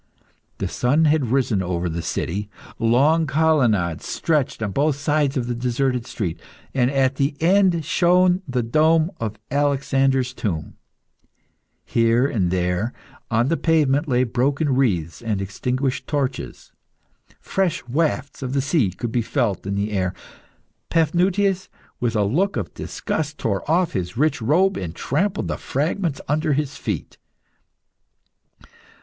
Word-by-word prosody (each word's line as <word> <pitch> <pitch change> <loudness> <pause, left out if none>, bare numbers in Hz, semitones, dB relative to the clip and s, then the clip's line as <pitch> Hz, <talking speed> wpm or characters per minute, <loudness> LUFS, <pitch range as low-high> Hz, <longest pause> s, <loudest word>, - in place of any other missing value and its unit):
The - - -2
sun 145 +6 +2
had 150 -4 +2
risen 125 -7 +2
over 90 -1 -2
the 85 0 -3
city. 100 +5 -3 0.3
Long 140 +8 +3
colonnades 125 - +2
stretched 150 -8 0
on 105 - -2
both 145 +5 +1
sides 145 0 0
of 125 - -1
the 120 - -2
deserted 125 +1 -1
street, 90 -7 -4 0.3
and 125 -2 +2
at 135 -1 +1
the 140 +1 0
end 180 -2 +3
shone 180 +3 +3
the 125 -2 -1
dome 155 +7 +3
of 110 -2 -3 0.2
Alexander's 135 -2 +1
tomb. 85 -11 -3 1.1
Here 115 +2 +3
and 105 -10 0
there 90 +5 0 0.4
on 120 +3 +2
the 165 - +1
pavement 155 -2 +2
lay 125 -2 +2
broken 135 +4 0
wreaths 90 - 0
and 110 -4 -1
extinguished 125 +7 -2
torches. 135 - -3 0.7
Fresh 175 -9 -1
wafts 140 0 -1
of 130 -1 -3
the 140 - +2
sea 140 - +2
could 115 +6 -5
be 120 - +1
felt 115 -6 -1
in 100 - -1
the 100 +2 -1
air. 95 -2 -1 0.7
Paphnutius, 180 +4 +1 0.3
with 120 -2 -1
a 105 - +3
look 160 - +1
of 100 -6 -4
disgust, 155 -1 -4
tore 105 +5 -2
off 170 +1 +2
his 95 +3 -3
rich 145 -1 +1
robe 175 - +3
and 85 -3 -5
trampled 190 - -1
the - - -2
fragments 155 +2 -1
under 150 +1 +1
his 145 0 -1
feet. - - -5
135 Hz, 140 wpm, -22 LUFS, 115-155 Hz, 1.1 s, Long